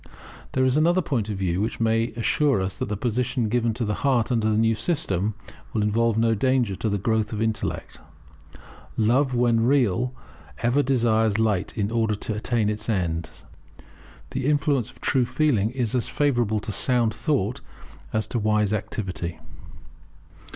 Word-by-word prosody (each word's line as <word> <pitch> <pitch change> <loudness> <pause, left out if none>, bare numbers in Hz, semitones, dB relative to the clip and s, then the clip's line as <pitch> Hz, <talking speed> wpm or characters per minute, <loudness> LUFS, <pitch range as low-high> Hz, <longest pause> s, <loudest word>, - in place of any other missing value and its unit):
There 130 0 +2
is 130 +2 +2
another 170 +4 +3
point 115 -8 -1
of 105 - -3
view 95 -1 -1
which 110 - -2
may 115 0 +2
assure 130 +3 +1
us 95 0 -2
that - - -3
the 105 - -2
position 120 +1 -1
given 120 0 +1
to 120 -1 -2
the 105 - -1
heart 130 -3 +2
under 110 -2 +1
the 105 - +1
new 115 0 +3
system 105 - -1 0.4
will 110 - +1
involve 115 +1 +1
no 115 0 +3
danger 125 -2 +1
to 110 - -1
the 100 - 0
growth 110 +2 0
of 110 - -4
intellect. 110 -1 -3 1.0
Love, 125 +4 +2
when 120 -2 +3
real, 125 -2 +2 0.5
ever 120 +4 +3
desires 115 -5 +2
light, 105 -5 0
in 105 0 -1
order 110 -2 +1
to 110 - -4
attain 110 +1 0
its 105 +1 -3
ends. 85 -6 -2 0.9
The 130 - -2
influence 145 -5 +1
of - - -18
true 130 -4 +2
feeling 120 -10 +1
is 125 -3 -2
as 125 -2 0
favourable 120 -7 +1
to 105 - -5
sound 120 0 +2
thought 125 - -1 0.5
as 110 0 0
to 120 - -2
wise 105 -1 +1
activity. 95 -5 -4
115 Hz, 165 wpm, -24 LUFS, 105-125 Hz, 1.0 s, another